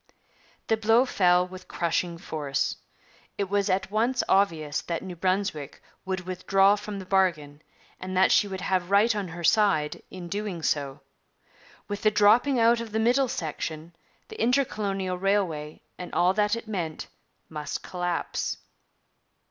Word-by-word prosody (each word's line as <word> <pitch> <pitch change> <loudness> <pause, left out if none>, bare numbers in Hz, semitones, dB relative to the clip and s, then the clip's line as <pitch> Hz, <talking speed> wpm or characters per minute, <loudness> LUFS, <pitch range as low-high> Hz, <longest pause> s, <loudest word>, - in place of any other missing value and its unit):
The 225 - +1
blow 225 +3 +4
fell 180 -6 +3
with 185 0 -11
crushing 170 0 -1
force. 150 -5 -2 0.6
It 200 -1 -2
was 200 0 +1
at 190 +1 0
once 235 +4 +1
obvious 160 -7 +1
that 170 -1 -4
New 185 -2 -7
Brunswick 185 -5 -2 0.3
would 185 -1 -2
withdraw 195 +2 +3
from 210 0 -6
the 190 - -7
bargain, 165 -7 0 0.4
and 185 0 -4
that 190 - +5
she 205 - +4
would 190 -2 -6
have 185 -1 -1
right 210 +3 +4
on 205 -2 -2
her 170 +1 -8
side 190 -6 +2
in 180 -2 -8
doing 200 -3 -4
so. 140 -3 -1 0.9
With 205 0 -4
the 215 - +4
dropping 220 +6 +4
out 230 +1 +4
of 225 -2 -8
the 220 - +1
middle 250 +4 +3
section, 160 - -5 0.3
the 440 - -8
intercolonial 200 -8 0
railway 180 -6 -1 0.2
and 180 - -7
all 180 +1 +3
that 210 +2 +2
it 230 -1 -8
meant 175 -7 -4 0.4
must 150 -2 -5
collapse. 175 -1 -3
190 Hz, 150 wpm, -26 LUFS, 170-210 Hz, 0.9 s, that